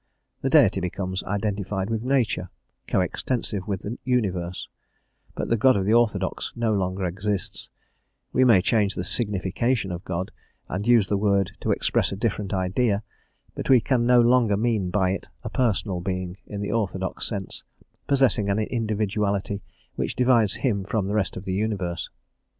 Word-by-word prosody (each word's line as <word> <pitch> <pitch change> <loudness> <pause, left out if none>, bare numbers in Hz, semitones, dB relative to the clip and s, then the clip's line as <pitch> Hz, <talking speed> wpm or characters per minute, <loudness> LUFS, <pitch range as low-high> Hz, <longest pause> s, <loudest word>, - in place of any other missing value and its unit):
The - - 0
Deity - - +5
becomes 95 +1 -3
identified 100 0 -2
with 110 0 -1
nature, 120 -9 0 0.4
co - - +2
extensive 105 -6 -2
with 100 -3 -2
the 110 +4 -5
universe; 95 -8 -1 0.7
but - - -3
the 115 - +3
God 130 +1 +5
of 95 - 0
the 105 - +3
orthodox 105 -5 +1
no 115 -2 +1
longer 95 -1 -1
exists; 95 +2 -3 0.6
we 130 - +4
may 110 -8 +6
change 105 -2 +2
the 90 - -2
signification 105 +1 0
of 85 0 -5
God, 90 +1 -3 0.4
and 100 +5 -3
use 115 -5 +5
the 100 -1 0
word 100 -2 +2
to - - -3
express - - +1
a - - -2
different 105 -2 -2
idea, 100 +3 +1 0.5
but - - -5
we 130 -2 +7
can 120 +1 +1
no 125 0 +6
longer 120 -3 +4
mean 110 -4 0
by 95 -1 +2
it 95 - -4 0.2
a - - -5
Personal 105 -6 0
Being 90 0 -3
in 100 -1 -5
the 100 - -2
orthodox 95 -4 -1
sense, 100 -4 -4 0.4
possessing 130 -7 +3
an 100 - +2
individuality 105 -3 -1 0.4
which - - -2
divides 120 -5 +3
him 105 -5 0
from 105 0 -1
the - - -1
rest 105 -5 0
of 95 - -7
the 95 - -2
universe. 95 -4 -2
100 Hz, 165 wpm, -25 LUFS, 95-115 Hz, 0.7 s, we